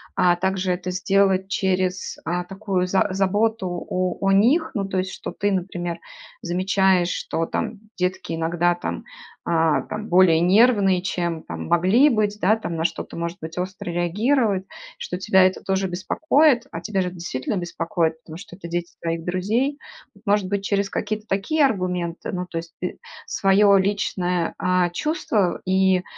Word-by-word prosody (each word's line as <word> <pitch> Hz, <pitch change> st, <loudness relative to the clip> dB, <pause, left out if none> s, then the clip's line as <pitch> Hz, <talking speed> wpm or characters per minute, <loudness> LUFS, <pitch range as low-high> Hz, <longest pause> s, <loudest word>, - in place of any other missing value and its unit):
а, 175 Hz, -1 st, +4 dB
также 190 Hz, +1 st, -1 dB
это 180 Hz, 0 st, -3 dB
сделать 190 Hz, 0 st, +2 dB
через, 185 Hz, -1 st, -1 dB
а, 175 Hz, +2 st, -1 dB
такую 195 Hz, 0 st, -2 dB
за 190 Hz, +2 st, +2 dB
заботу 200 Hz, +2 st, +1 dB, 0.2 s
о 185 Hz, -1 st, -1 dB
о 195 Hz, 0 st, +2 dB
них, 250 Hz, -, +3 dB
ну, 200 Hz, -5 st, -1 dB
то 190 Hz, -, -3 dB
есть 185 Hz, +1 st, -2 dB
что -, -, -6 dB
ты, 205 Hz, 0 st, -1 dB
например, 175 Hz, -2 st, -3 dB, 0.4 s
замечаешь, 185 Hz, 0 st, +2 dB
что 165 Hz, -2 st, -2 dB
там 215 Hz, +5 st, -3 dB, 0.2 s
детки 180 Hz, -1 st, -2 dB
иногда 170 Hz, +2 st, +1 dB
там, 175 Hz, -, -5 dB, 0.4 s
а, 165 Hz, -2 st, +2 dB
там 215 Hz, 0 st, -6 dB
более 175 Hz, -2 st, +5 dB
нервные, 195 Hz, 0 st, +4 dB
чем 175 Hz, -3 st, -2 dB
там 80 Hz, -1 st, -6 dB
могли 195 Hz, -, +4 dB
быть, 210 Hz, -4 st, 0 dB
да, 210 Hz, +4 st, +4 dB
там 215 Hz, -6 st, -5 dB
на 160 Hz, -, -1 dB
что-то 170 Hz, -, -3 dB
может 170 Hz, +1 st, -4 dB
быть 160 Hz, +2 st, -7 dB
остро 185 Hz, 0 st, -4 dB
реагируют, 200 Hz, +4 st, +1 dB, 0.3 s
что 180 Hz, -, -5 dB
тебя 190 Hz, 0 st, +4 dB
это 185 Hz, -, 0 dB
тоже 190 Hz, 0 st, 0 dB
беспокоит, 260 Hz, -, +2 dB
а 165 Hz, -, -5 dB
тебя 195 Hz, +1 st, -1 dB
ж -, -, -1 dB
это 180 Hz, -, -7 dB
действительно 170 Hz, 0 st, -3 dB
беспокоит, 165 Hz, -2 st, -2 dB
потому 160 Hz, 0 st, -10 dB
что 180 Hz, -1 st, -11 dB
это 175 Hz, -2 st, -9 dB
дети 175 Hz, 0 st, -3 dB
твоих 165 Hz, 0 st, -2 dB
друзей. 220 Hz, +11 st, 0 dB, 0.4 s
Вот 200 Hz, -, -21 dB
может 200 Hz, -2 st, +2 dB
быть, 200 Hz, 0 st, -2 dB
через 200 Hz, 0 st, 0 dB
какие-то 215 Hz, +1 st, -3 dB
такие 280 Hz, +11 st, +2 dB
аргументы, 180 Hz, -7 st, -2 dB
ну, 180 Hz, 0 st, -3 dB
то 175 Hz, -, -6 dB
есть 165 Hz, 0 st, -10 dB
т 180 Hz, -, -4 dB, 0.3 s
свое 200 Hz, +1 st, +4 dB
личное, 180 Hz, -3 st, -1 dB
а, 180 Hz, -1 st, +2 dB
чувство 210 Hz, -, 0 dB
и, 190 Hz, -1 st, +3 dB
185 Hz, 165 wpm, -23 LUFS, 175-200 Hz, 0.4 s, более